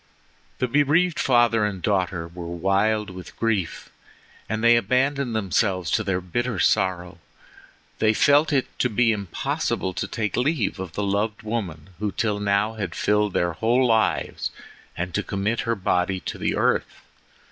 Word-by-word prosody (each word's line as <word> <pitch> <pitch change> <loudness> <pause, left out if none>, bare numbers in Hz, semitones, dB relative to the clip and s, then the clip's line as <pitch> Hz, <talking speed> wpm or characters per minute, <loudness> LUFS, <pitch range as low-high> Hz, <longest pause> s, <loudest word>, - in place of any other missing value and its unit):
The 125 - 0
bereaved 150 +6 +2
father 120 -4 +3
and 105 -3 -1
daughter 90 -3 -1
were 85 0 -8
wild 95 +4 0
with 90 0 -10
grief, 105 -7 -2 0.6
and 110 +1 -2
they 120 0 +7
abandoned 125 +2 +1
themselves 95 -4 0
to 110 - +2
their 95 -2 0
bitter 115 +6 -2
sorrow. 90 -2 +1 0.8
They 110 0 +3
felt 145 +5 +4
it 135 -3 +2
to 125 - +2
be 115 +1 +3
impossible 95 -2 -2
to - - -3
take 105 -3 -2
leave 125 - 0
of 95 -4 -6
the 105 - -2
loved 100 +2 -1
woman 95 -7 -4
who 105 -1 -1
till 105 -1 -1
now 100 +2 +1
had 95 -6 -5
filled 105 -1 +1
their 85 -1 +1
whole 120 +8 +2
lives 110 -2 +1 0.5
and 90 +1 -3
to - - +1
commit 100 +4 -2
her 115 - +2
body 95 -1 0
to - - -6
the - - 0
earth. - - 0
105 Hz, 160 wpm, -24 LUFS, 95-115 Hz, 0.8 s, they